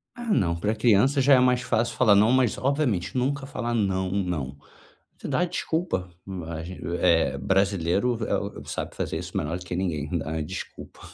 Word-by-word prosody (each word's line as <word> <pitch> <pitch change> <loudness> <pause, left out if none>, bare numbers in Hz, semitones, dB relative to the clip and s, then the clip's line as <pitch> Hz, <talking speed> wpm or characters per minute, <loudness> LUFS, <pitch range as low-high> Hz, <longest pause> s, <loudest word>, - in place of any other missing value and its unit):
Ah 240 - -7
não, 95 - +2
pra 105 +6 -1
criança 120 +5 +3
já 140 +1 +5
é - - +5
mais 125 -1 +3
fácil 120 -1 0
falar 110 -4 +5
não, 105 +4 +5
mas 130 -3 +2
obviamente 130 - 0
nunca 135 +2 0
falar 120 -3 -3
não, 95 -4 0
não. 85 -9 -2 0.6
Você - - -8
dá 180 - +2
desculpa, 160 - -2 0.4
a 80 -1 -5
gente 90 +2 -8 0.2
eh, 80 -6 +3
brasileiro 95 - +1
eh, - - +1 0.2
o - - -12
sabe - - -5
fazer - - -3
isso - - -5
melhor 80 +4 -2
do 90 - -9
que 85 - -4
ninguém, 80 -6 -2 0.2
a 80 +1 -3
desculpa. 75 - -8
100 Hz, 185 wpm, -25 LUFS, 85-125 Hz, 0.6 s, já